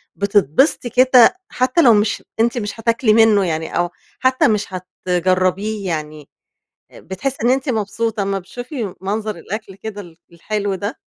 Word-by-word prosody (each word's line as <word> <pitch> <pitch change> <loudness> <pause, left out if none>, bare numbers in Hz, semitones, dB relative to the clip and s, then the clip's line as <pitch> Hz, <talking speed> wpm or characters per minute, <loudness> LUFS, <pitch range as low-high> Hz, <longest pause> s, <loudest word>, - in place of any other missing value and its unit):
بتتبسطي 200 - +2
كده 255 +5 +5
حتى 255 +6 +1
لو 240 -6 +7
مش 210 0 +1 0.2
أنتِ 235 +2 +2
مش 210 0 -4
هتاكلي 230 0 +2
منه 215 -3 +5
يعني 160 -1 -3
أو 175 0 +1 0.3
حتى 260 0 +3
مش 210 -2 +1
هتجربيه 185 +3 -1
يعني 155 -3 -5 0.6
آآ - - -14
بتحسي 255 +9 -4
إن 240 - +3
أنتِ 265 +1 +1
مبسوطة 220 -1 -1
أمّا 195 0 -1
بتشوفي 230 - -6
منظر 210 +2 -3
الأكل 195 +2 -7
كده 205 0 -7
ال 170 -4 -15 0.2
الحلو 205 +3 -3
ده؟ 205 +4 -5
205 Hz, 150 wpm, -19 LUFS, 185-230 Hz, 0.6 s, لو